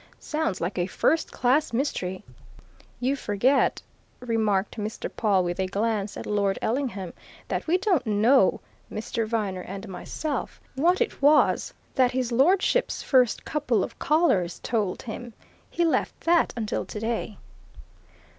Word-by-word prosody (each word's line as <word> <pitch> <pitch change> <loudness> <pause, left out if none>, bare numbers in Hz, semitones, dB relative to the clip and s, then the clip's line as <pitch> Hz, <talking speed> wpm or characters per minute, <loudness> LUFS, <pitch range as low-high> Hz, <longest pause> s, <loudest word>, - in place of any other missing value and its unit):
Sounds 310 - -2
like 180 +2 -2
a 175 - 0
first 320 - +1
class 265 +5 +2
mystery!" 210 -7 -2 0.8
"You 260 +3 +1
forget," 255 +3 +1 0.4
remarked 220 -4 0
Mr. 215 +1 -4
Pawle 200 -5 +2
with 175 +1 -3
a 190 - +1
glance 205 +1 -1
at - - -6
Lord 200 -2 0
Ellingham, 225 -8 -2 0.3
"that - - -3
we 345 +3 +3
don't 370 - +1
know 215 +1 +4 0.3
Mr. 225 +1 -3
Viner 210 -5 -2
and 195 +4 -7
myself 270 - -4
what 345 - +2
it 465 - -1
was 295 +1 +4 0.2
that 255 -2 +3
his 255 -1 -1
lordship's 365 - +2
first 255 -4 +3
couple 250 -9 0
of - - -7
callers 270 - +2
told 210 -6 -1
him. 240 0 -7 0.3
He 345 - 0
left 325 - 0
that 340 0 +3
until 220 -2 -2
today." 220 -1 -4
230 Hz, 135 wpm, -26 LUFS, 200-280 Hz, 0.8 s, know